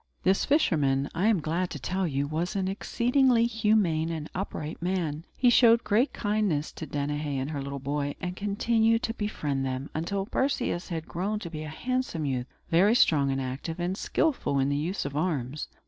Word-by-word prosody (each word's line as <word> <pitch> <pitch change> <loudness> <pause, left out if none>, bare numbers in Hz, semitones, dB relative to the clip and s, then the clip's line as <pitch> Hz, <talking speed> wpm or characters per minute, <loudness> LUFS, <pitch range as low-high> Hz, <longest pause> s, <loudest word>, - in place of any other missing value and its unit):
This 190 +1 +3
fisherman, 145 - +2
I 180 +6 +1
am 220 -5 +4
glad 170 +4 -1
to 150 - -6
tell 185 +7 -1
you, 140 -2 -1
was 160 +6 -2
an 190 -1 0
exceedingly 240 +4 +2
humane 210 -8 +2
and 160 -2 -5
upright 165 -5 -5
man. 170 -4 -2
He 245 -2 +5
showed 235 -1 +6
great 235 +7 +2
kindness 205 -8 0
to 160 - -7
Danaë 145 +1 -2
and 135 +3 -2
her 145 -2 -3
little 140 0 -5
boy; 140 +1 -2
and 180 -1 -4
continued 225 +3 +1
to 225 - -1
befriend 150 - -2
them, 130 +2 -3
until 195 +5 -2
Perseus 245 -7 -1
had 165 -2 -4
grown 195 +5 -2
to 175 -5 -7
be 155 -2 -5
a 155 - -5
handsome 245 -2 -2
youth, 130 -2 -2 0.2
very 195 +7 +5
strong 145 - +4
and 135 0 0
active, 135 +6 -4
and 175 +2 -1
skilful 265 - 0
in 135 0 +2
the 145 - +1
use 165 +6 -2
of 140 0 -4
arms. 150 -4 -2
170 Hz, 190 wpm, -28 LUFS, 145-210 Hz, 0.2 s, showed